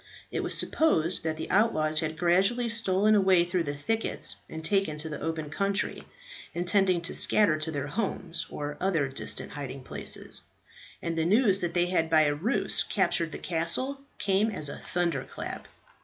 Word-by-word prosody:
It -, -, -2 dB
was -, -, 0 dB
supposed 170 Hz, -, +1 dB
that 160 Hz, -1 st, -2 dB
the 160 Hz, -, -5 dB
outlaws 155 Hz, -7 st, +3 dB
had 155 Hz, -1 st, -3 dB
gradually 195 Hz, +8 st, +2 dB
stolen 215 Hz, -2 st, +2 dB
away 190 Hz, -4 st, +4 dB
through 175 Hz, -1 st, -1 dB
the 145 Hz, 0 st, -3 dB
thickets 225 Hz, +10 st, 0 dB
and 160 Hz, 0 st, -6 dB
taken 195 Hz, -4 st, +1 dB
to 160 Hz, +1 st, -3 dB
the 150 Hz, -, -6 dB
open 160 Hz, -2 st, -3 dB
country, 200 Hz, +4 st, -1 dB, 0.5 s
intending 180 Hz, 0 st, +2 dB
to 170 Hz, -, -1 dB
scatter 205 Hz, -7 st, +4 dB
to 155 Hz, +1 st, -1 dB
their 145 Hz, -3 st, -3 dB
homes, 170 Hz, -2 st, -3 dB
or 145 Hz, 0 st, -5 dB
other 170 Hz, -7 st, +1 dB
distant 135 Hz, -, -3 dB
hiding 135 Hz, -2 st, -7 dB
places; -, -, -3 dB, 0.6 s
and 170 Hz, -1 st, -2 dB
the 165 Hz, -, +1 dB
news 200 Hz, +1 st, +4 dB
that 175 Hz, -2 st, -3 dB
they 175 Hz, 0 st, +3 dB
had 175 Hz, -3 st, 0 dB
by 160 Hz, -1 st, +5 dB
a 145 Hz, -1 st, +2 dB
ruse 190 Hz, -, +1 dB
captured 165 Hz, -2 st, 0 dB
the -, -, -5 dB
castle, 180 Hz, +12 st, 0 dB, 0.2 s
came 200 Hz, +2 st, +2 dB
as 155 Hz, -9 st, 0 dB
a -, -, -6 dB
thunderclap. 170 Hz, -6 st, -3 dB
170 Hz, 170 wpm, -28 LUFS, 155-195 Hz, 0.6 s, by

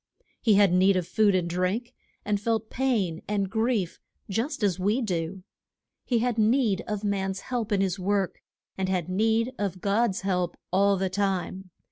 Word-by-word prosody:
He 220 Hz, -4 st, +4 dB
had 200 Hz, -3 st, +5 dB
need 190 Hz, +2 st, +4 dB
of 180 Hz, -2 st, -1 dB
food 210 Hz, -3 st, +3 dB
and 180 Hz, -2 st, +1 dB
drink, 185 Hz, +7 st, -1 dB, 0.3 s
and 205 Hz, -1 st, 0 dB
felt 220 Hz, 0 st, -1 dB
pain 220 Hz, -11 st, 0 dB
and 200 Hz, -2 st, -1 dB
grief 220 Hz, -5 st, 0 dB, 0.3 s
just 240 Hz, +5 st, -2 dB
as 190 Hz, -3 st, +1 dB
we 205 Hz, +6 st, +1 dB
do. 185 Hz, -4 st, -3 dB, 0.6 s
He 245 Hz, -, +1 dB
had 235 Hz, 0 st, 0 dB
need 220 Hz, -3 st, +3 dB
of 210 Hz, -2 st, -3 dB
man's 195 Hz, -1 st, -1 dB
help 235 Hz, -3 st, -3 dB
in 200 Hz, -2 st, +2 dB
his 190 Hz, -1 st, 0 dB
work; 195 Hz, 0 st, -1 dB, 0.4 s
and 190 Hz, -1 st, 0 dB
had 185 Hz, -3 st, -1 dB
need 225 Hz, +5 st, +1 dB
of 195 Hz, -2 st, -2 dB
God's 200 Hz, +1 st, +1 dB
help 180 Hz, -3 st, -1 dB, 0.2 s
all 200 Hz, +1 st, +4 dB
the 190 Hz, 0 st, -1 dB
time. 190 Hz, -1 st, -2 dB
200 Hz, 170 wpm, -27 LUFS, 185-220 Hz, 0.6 s, had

